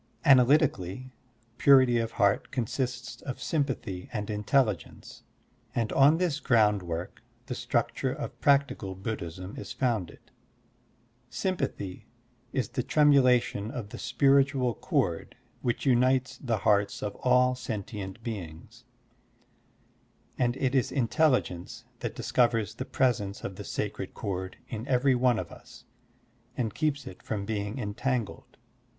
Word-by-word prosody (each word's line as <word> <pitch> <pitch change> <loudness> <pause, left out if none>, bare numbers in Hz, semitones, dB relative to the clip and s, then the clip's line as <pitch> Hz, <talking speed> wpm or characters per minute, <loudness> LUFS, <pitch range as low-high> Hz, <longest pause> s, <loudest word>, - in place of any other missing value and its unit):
Analytically, 130 - +3 0.5
purity 130 -4 +6
of 115 0 -2
heart 100 -2 +2
consists 125 0 -3
of 130 - -6
sym 150 -3 0
pathy 95 -9 -5
and 105 -1 -3
intelligence, 105 - -1 0.5
and 115 -2 0
on 145 +4 +6
this 170 -5 0
groundwork 105 - +1 0.2
the - - -4
structure - - -1
of - - -6
practical 140 -9 +2
Buddhism 95 -2 -5
is - - -7
fotmded. 115 -10 -2 1.0
Sympathy 120 - -3 0.4
is 125 -6 -1
the 130 - -2
tremulation 125 -7 +3
of 120 -6 -6
the - - -8
spiritual 135 -3 +3
cord - - -1 0.3
which 120 +3 -1
unites 130 0 +2
the 120 -5 -1
hearts 100 0 +1
of 105 - -2
all 125 0 +3
sentient 105 -4 -6
beings; 105 +2 -7 1.5
and 120 0 0
it 135 -1 0
is 130 -2 +2
intelligence 125 - 0
that - - -4
discovers 115 -4 +1
the 130 +3 -5
presence 105 -8 0
of 95 - -5
the 100 - -7
sacred 100 -2 -4
cord 95 -2 -4
in 115 +2 -6
every 130 +1 +3
one 125 -1 +3
of - - -5
us - - -14 0.7
and 115 -5 -1
keeps 145 -2 -1
it 90 - -10
from 100 -2 -4
being 105 +2 -3
entangled. 120 +1 -3
120 Hz, 125 wpm, -28 LUFS, 105-130 Hz, 1.5 s, purity